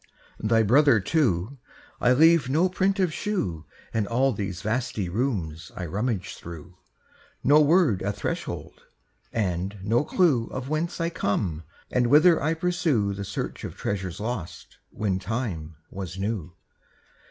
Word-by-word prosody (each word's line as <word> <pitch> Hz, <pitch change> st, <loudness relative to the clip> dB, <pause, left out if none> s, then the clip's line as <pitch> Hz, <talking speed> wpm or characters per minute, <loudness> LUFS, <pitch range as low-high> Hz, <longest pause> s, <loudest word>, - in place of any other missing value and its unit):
Thy 115 Hz, +1 st, +3 dB
brother 130 Hz, +2 st, +5 dB
too, 120 Hz, -, 0 dB, 0.4 s
I 125 Hz, -, +4 dB
leave 160 Hz, -1 st, +5 dB
no 165 Hz, +7 st, +3 dB
print 190 Hz, +2 st, +1 dB
of 180 Hz, -5 st, +1 dB
shoe 90 Hz, -, -2 dB, 0.3 s
In 110 Hz, -2 st, 0 dB
all 130 Hz, +4 st, +2 dB
these 95 Hz, -3 st, -4 dB
vasty 110 Hz, -4 st, -1 dB
rooms 90 Hz, -, -2 dB
I 90 Hz, -, -4 dB
rummage 100 Hz, +2 st, -2 dB
through, 85 Hz, +1 st, -10 dB, 0.7 s
No 150 Hz, +3 st, +6 dB
word 150 Hz, -, +4 dB
at 100 Hz, +1 st, -2 dB
threshold, -, -, -5 dB, 0.5 s
and 95 Hz, -1 st, -2 dB
no 115 Hz, +6 st, +2 dB
clue 150 Hz, -8 st, +2 dB
Of 130 Hz, +1 st, -6 dB
whence 155 Hz, +3 st, -2 dB
I 165 Hz, 0 st, 0 dB
come 90 Hz, -, -1 dB, 0.3 s
and 125 Hz, -1 st, +2 dB
whither 155 Hz, +6 st, +6 dB
I 155 Hz, +3 st, +1 dB
pursue 160 Hz, -, +1 dB
The 100 Hz, +1 st, -5 dB
search -, -, -5 dB
of -, -, -6 dB
treasures 95 Hz, -3 st, -3 dB
lost 105 Hz, -7 st, -5 dB
When 95 Hz, -3 st, -1 dB
time 95 Hz, -7 st, -4 dB, 0.2 s
was 95 Hz, -1 st, -6 dB
new. 95 Hz, -4 st, -3 dB
110 Hz, 140 wpm, -26 LUFS, 95-145 Hz, 0.7 s, No